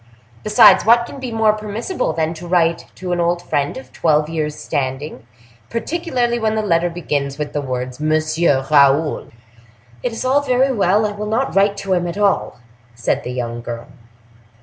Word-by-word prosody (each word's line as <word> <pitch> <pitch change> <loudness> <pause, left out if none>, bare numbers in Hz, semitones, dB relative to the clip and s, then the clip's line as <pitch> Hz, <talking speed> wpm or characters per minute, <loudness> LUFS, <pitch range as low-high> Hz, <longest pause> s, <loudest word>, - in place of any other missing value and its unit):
Besides, 210 0 +6
what 235 +1 +5
can 275 - -10
be 255 -2 -5
more 220 -1 +3
permissible 215 - -3
than 160 0 -1
to 170 +2 -9
write 170 -1 +1
to 185 -1 -5
an 175 - 0
old 175 0 0
friend 145 -3 -1
of 130 -1 -11
twelve 155 -2 +1
years' 155 -2 -2
standing, 130 -2 -4 0.4
particularly 245 -2 -1
when 220 -1 0
the 215 - 0
letter 175 -3 +1
begins 145 -5 -3
with 150 -1 -4
the 145 - -1
words 125 -1 -4
'Monsieur 155 -2 +1
Raoul'?" 145 +1 +3 0.7
"It - - -2
is 225 - -5
all 270 +3 +3
very 265 0 +2
well—I 210 -1 +2
will 210 +1 -5
not 230 +5 -1
write 200 +1 +3
to 190 - +1
him 175 -1 0
at 170 +2 -5
all," 205 -1 +1 0.4
said 115 -1 -1
the - - -5
young 120 -1 -4
girl. 115 0 -7
175 Hz, 175 wpm, -19 LUFS, 145-215 Hz, 0.7 s, Besides